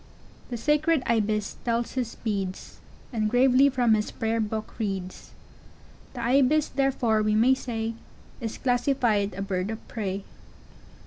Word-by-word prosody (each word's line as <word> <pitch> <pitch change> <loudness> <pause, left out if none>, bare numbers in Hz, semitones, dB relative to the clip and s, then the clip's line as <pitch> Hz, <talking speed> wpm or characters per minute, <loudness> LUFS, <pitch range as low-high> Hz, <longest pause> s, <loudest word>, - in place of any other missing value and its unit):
] - - -25
The 240 - -3
sacred 300 +3 +2
Ibis 215 -2 0
tells 235 0 0
his 250 -3 -3
beads, 195 -4 -4 0.3
And 215 -2 0
gravely 260 +3 +5
from 245 -4 +3
his 210 -1 +1
prayer 225 0 -1
book 220 +1 -4
reads; 195 -4 -4 0.9
The 245 - -4
Ibis 275 +5 +3
therfore 260 -5 +1
we 215 0 +2
may 240 +4 +5
say, 230 -3 -3 0.5
Is 225 -2 -4
classified 245 -6 +1
a 195 - -3
bird 190 0 -2
of 220 0 -7
prey. 195 -3 -3
230 Hz, 140 wpm, -26 LUFS, 215-255 Hz, 0.9 s, gravely